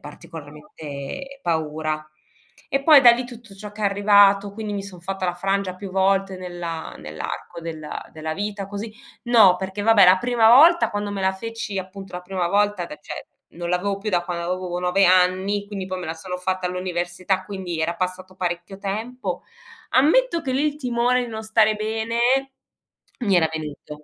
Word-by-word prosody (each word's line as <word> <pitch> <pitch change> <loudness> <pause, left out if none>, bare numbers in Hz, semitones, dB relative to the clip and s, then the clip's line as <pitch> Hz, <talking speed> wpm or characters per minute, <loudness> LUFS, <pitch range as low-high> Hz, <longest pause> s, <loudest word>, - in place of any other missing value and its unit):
particolarmente 150 - -9
paura. 155 -1 -2 0.6
E 275 0 0
poi 305 -3 +9
da 240 - +10
lì 245 +1 -1
tutto 235 -4 -12
ciò 210 +1 -9
che 215 - -11
è - - +1
arrivato, 200 0 +4
quindi 210 0 -5
mi 200 -1 -3
son 185 -3 -11
fatta 190 +2 -4
la 180 - -1
frangia 195 0 -1
più 195 0 -7
volte 195 0 +1
nella 175 -3 -6
nell'arco 75 - -7
della 160 -2 -7
della 155 0 -4
vita 205 -1 -4
così 210 +2 -6 0.3
no 220 -7 +6
perché 190 +2 -5
vabbè, 225 -3 +6
la 185 +1 +7
prima 235 0 +3
volta 325 +8 +7
quando 205 0 -3
me 200 -1 -4
la 190 0 +2
feci 225 0 -6
appunto 190 0 -8
la 180 - -5
prima 180 -1 -2
volta 205 -2 +1
da 150 - -9
cioè - - -8 0.3
non 170 0 -5
l'avevo 195 +3 0
più 210 +2 -5
da 175 -1 +1
quando 170 -1 -4
avevo 180 -1 -3
9 180 +2 +3
anni, 185 +3 +3
quindi 200 -2 -5
poi 185 -1 -4
me 180 - -6
la 160 - -3
sono 180 +2 -6
fatta 185 0 -2
all'università, 180 +1 -2
quindi 185 -4 -5
era 170 +2 0
passato 185 +1 -4
parecchio 180 +1 -4
tempo, 220 +6 -4 0.5
ammetto 335 - +3
che 265 - -3
lì 270 +3 +1
il 295 -1 0
timone 250 -2 +1
di - - -7
non 220 -1 -6
stare 220 0 +3
bene 220 +2 -2 1.0
mi 200 -6 +2
era 160 -2 +3
venuto 150 -1 -7
190 Hz, 180 wpm, -23 LUFS, 175-215 Hz, 1.0 s, da